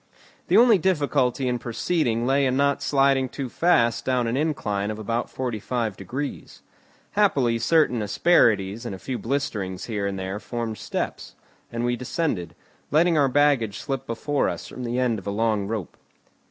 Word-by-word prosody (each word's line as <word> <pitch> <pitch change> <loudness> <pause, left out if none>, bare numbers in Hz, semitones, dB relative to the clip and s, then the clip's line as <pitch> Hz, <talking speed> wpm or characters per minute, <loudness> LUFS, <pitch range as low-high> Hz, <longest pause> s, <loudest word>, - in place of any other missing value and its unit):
The - - +4
only 230 -4 +6
difficulty 145 -7 +1
in 125 -1 0
proceeding 120 -1 -1
lay 135 +1 +3
in 130 0 0
not 140 0 +2
sliding 135 -2 +2
too 135 0 -5
fast 120 -9 +2
down 125 -2 +1
an 115 +1 -1
incline 110 -9 -1
of 110 - -4
about 115 +2 -2
forty 125 -4 -3
five 115 -2 -2
degrees; 135 +7 -6 0.5
happily 135 - +2
certain 125 -2 +3
asperities 105 - +2
and 115 -5 -5
a - - -8
few 125 +6 -5
blisterings 105 -7 -3
here 105 -4 -2
and 100 -1 -3
there 95 +2 -4
formed 115 -2 -4
steps, - - -4 0.4
and 115 +1 -2
we 120 0 +1
descended, 115 - -3 0.3
letting 165 +3 +3
our 140 -3 +3
baggage 135 -7 +2
slip 135 -3 -4
before 140 +5 0
us - - -6
from 125 - -7
the 120 +1 -2
end 125 -4 +1
of 95 - -12
a - - 0
long 105 -1 0
rope. 105 -6 -4
120 Hz, 170 wpm, -24 LUFS, 110-140 Hz, 0.5 s, only